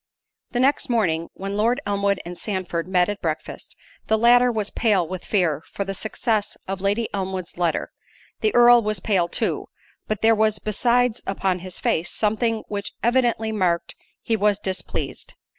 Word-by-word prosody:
The 245 - -2
next 270 +2 +2
morning, 170 -9 +1
when 195 +1 -5
Lord 230 +5 +2
Elmwood 200 -1 0
and 175 +1 -6
Sandford 180 -4 -3
met 180 -1 +3
at 205 0 -4
breakfast, 160 -2 -5 0.3
the 220 - +3
latter 245 +2 +5
was 215 -3 -1
pale 200 -7 +2
with 185 0 -6
fear 170 -8 +1
for 200 - -2
the 195 - -3
success 215 +1 -1
of 195 0 -4
Lady 205 +3 +1
Elmwood's 190 -2 -4
letter—the 175 - -3
Earl 240 0 +7
was 215 -3 -1
pale 185 -3 +1
too, - - -1 0.4
but 215 -1 -3
there 225 0 +6
was 215 -1 +2
besides 240 +2 +1
upon 190 -1 0
his 185 0 -4
face, 165 +2 0
something 220 +1 0
which 200 -1 -4
evidently 235 -2 +2
marked 180 -5 0 0.3
he 225 - +1
was 210 -1 +2
displeased. 190 -4 -4
205 Hz, 160 wpm, -23 LUFS, 185-225 Hz, 0.4 s, Earl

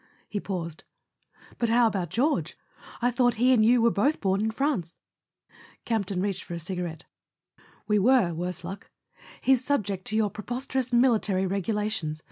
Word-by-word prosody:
He 205 - -3
paused. 170 -5 -5 0.8
"But 235 - +1
how 235 +1 +4
about 190 -6 -1
George—I 250 - -2
thought 245 0 +2
he 250 +3 +4
and 225 -4 +4
you 235 +1 +4
were 235 - +5
both 270 +10 +1
born 195 0 +1
in 220 - +1
France? 220 - -2 0.4
" - - -25
Campton 200 -5 -1
reached 200 -2 -2
for 175 - -6
a - - -4
cigarette. 175 -1 -5 0.8
"We 210 -1 +3
were, 215 -5 +4
worse 180 +2 -4
luck. 190 +3 -8 0.5
He's 260 -1 +3
subject 205 -9 -1
to 215 - 0
your 215 -2 +2
preposterous 250 +3 -3
military 225 -6 +3
regu¬ 195 +1 -1
lations. 195 -8 -2
210 Hz, 160 wpm, -27 LUFS, 185-245 Hz, 0.8 s, were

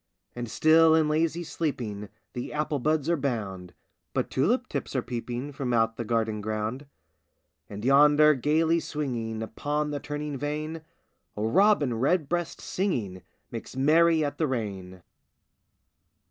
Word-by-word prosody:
And 120 -1 -5
still 160 +3 +5
in 160 -1 +3
lazy 160 +2 0
sleeping 115 - -4 0.2
The 120 - -5
apple 150 -1 -1
buds 155 +2 0
are 170 - +3
bound, 100 - -4 0.4
But - - -1
tulip 240 - +1
tips - - -4
are 130 - 0
peeping 120 +3 -4
From 135 -3 -3
out 115 -1 +2
the 120 - -4
garden 110 -1 -1
ground. 110 +6 -3 0.8
And 105 +2 -7
yonder, 150 +3 +6
gayly 160 +5 +2
swinging 120 -8 -3
Upon 150 +6 -2
the 145 - -3
turning 145 -1 -5
vane, 155 +2 -3 0.6
A 105 - -2
robin 155 - +3
redbreast 170 +4 0
singing 115 - -2 0.3
Makes - - -7
merry 160 +3 +4
at 145 0 -4
the 160 - +2
rain! 95 -8 -5
140 Hz, 135 wpm, -27 LUFS, 115-155 Hz, 0.8 s, yonder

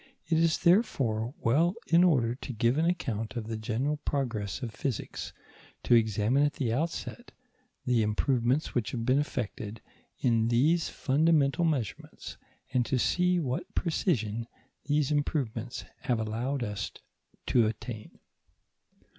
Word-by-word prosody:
It 160 0 +2
is 165 -1 +3
therefore 135 - +2
well, 165 - +3
in 170 +2 +5
order 130 -10 +3
to 130 +1 -7
give 120 +5 +2
an 165 - +2
account 115 -12 -2
of 115 -3 -3
the 110 0 -4
general 120 +7 -1
progress 120 -7 -2
of 115 -3 -4
physics, 135 -6 -4 0.5
to - - +3
examine 110 +3 +3
at 145 0 +2
the 125 -6 -1
outset 165 - -3 0.5
the 125 -3 +3
improvements 120 +5 +1
which 120 -4 0
have 115 -2 -2
been 130 +3 +3
effected 110 -6 -4 0.4
in 115 -2 +2
these 150 +8 +2
fundamental 150 +2 +2
measurements, 135 - -3 0.4
and 125 -2 +3
to 130 - +1
see 180 +7 +2
what 130 -5 -3
precision 115 - 0 0.4
these 145 0 +1
improvements 130 -5 -2
have 120 -3 0
allowed 120 +5 -2
us 105 -6 -3 0.5
to 115 -3 +3
attain. 110 0 -6
125 Hz, 135 wpm, -29 LUFS, 115-150 Hz, 0.5 s, in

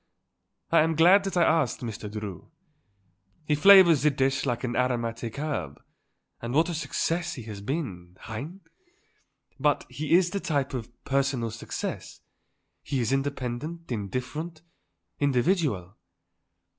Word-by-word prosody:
I - - +6
am 160 +1 +2
glad 180 +5 +6
that 195 -1 -2
I 175 - +5
asked 160 -6 +2
Mr. 110 -3 -5
Drew. 105 -4 -7 1.0
He 150 - +1
flavours 175 -1 +7
the 150 - +4
dish 135 0 0
like 120 -1 -1
an 120 -1 -2
aromatic 120 -2 -1
herb; 145 - -3 0.6
and 120 +2 -4
what 160 +3 +3
a - - -2
success 165 +2 -2
he 125 - -8
has 105 -2 -8
been; 95 - -5
hein? 140 - -7 1.0
But - - +1
he 155 +1 -2
is 180 -1 +3
the 200 - -1
type 140 -7 -1
of 120 -3 -4 0.2
personal 135 -4 0
success. 110 - -6 0.6
He 140 -2 -2
is 120 +1 0
independent, 140 +4 -3
indifferent, 130 - -4 0.6
individual." 135 - +1
135 Hz, 130 wpm, -27 LUFS, 115-160 Hz, 1.0 s, flavours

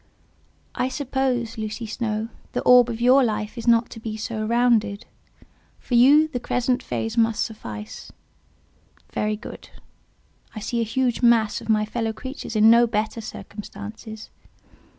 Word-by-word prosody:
I 255 - -1
suppose, 260 -4 -2
Lucy 215 +2 -4
Snowe, 220 0 -3 0.2
the - - -1
orb 250 -1 +6
of 230 -1 -4
your 255 +3 +5
life 215 -2 -2
is 235 0 -7
not 235 0 +3
to 225 - -9
be 220 -1 -5
so 215 0 -4
rounded: 230 -3 +2 0.7
for - - -8
you, 280 +6 +6
the 250 - -3
crescent 250 +1 0
phase 225 +1 -3
must 225 -1 +2
suffice. 110 - -8 1.0
Very 215 0 0
good. 220 - -10 0.9
I - - -4
see 235 +2 -2
a 225 -1 -3
huge 250 -1 0
mass 235 -3 +3
of - - -11
my 215 -1 +3
fellow 225 0 -2
creatures 260 0 -7
in 215 0 +5
no 235 +1 +6
better 220 +1 -2
circumstances. 215 +1 -9
230 Hz, 150 wpm, -23 LUFS, 215-245 Hz, 1.0 s, orb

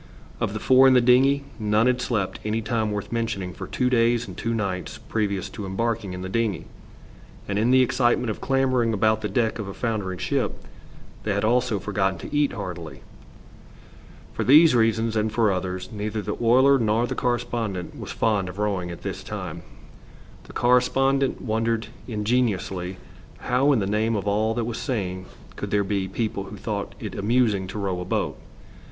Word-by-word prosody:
Of - - -1
the - - -3
four 130 +1 +6
in 130 - +6
the - - +7
dingey 130 +3 +4 0.2
none 105 +1 +2
had 125 0 +2
slept 105 -7 -1
any 110 +1 -1
time 110 -1 0
worth 105 -1 -4
mentioning 110 -6 -2
for - - -7
two 125 - 0
days 120 -1 +2
and - - -8
two 115 - -3
nights 95 -4 -3
previous 100 -3 -2
to 105 - -7
embarking 105 0 -2
in 90 0 -6
the - - -4
dingey, 105 -3 -1 0.8
and 100 0 -1
in 115 +3 +2
the 130 0 +6
excitement 120 -1 +1
of - - -7
clambering 130 -4 +2
about 110 +1 +2
the 105 - -2
deck 115 -3 0
of 105 - -4
a 95 - -7
foundering 105 -6 -2
ship - - -1 0.7
they 100 -2 -1
had 100 - 0
also 120 -1 +2
forgotten 95 -1 -1
to 145 - -7
eat 145 -1 +2
heartily. 90 -7 -7 1.3
For - - -2
these 155 +3 +7
reasons, 115 -1 +2
and 110 0 +1
for 110 -2 +2
others, 95 0 -3
neither 105 0 -3
the - - -3
oiler 130 +4 +5
nor 115 +1 +2
the - - -3
correspondent 115 -6 -2
was - - -7
fond 105 -5 0
of 90 - -9
rowing 100 -4 -1
at 85 - -8
this - - -5
time. - - -6 0.8
The - - -13
correspondent 135 +2 +2
wondered 115 0 -1 0.2
ingenuously 105 -5 -1 0.4
how 130 +4 +2
in 135 - +4
the 100 - 0
name 110 +3 +1
of 100 -1 -3
all 110 +2 +1
that 120 -2 -1
was 115 -1 -4
sane 95 -8 -3 0.3
could - - -5
there 105 -1 +2
be 100 -1 -1
people 100 0 -3
who 105 - -9
thought 100 -1 -4
it 105 -4 -6
amusing 105 -2 +1
to 95 - -7
row 95 -3 -2
a - - -5
boat. - - -2
110 Hz, 185 wpm, -24 LUFS, 100-120 Hz, 1.3 s, the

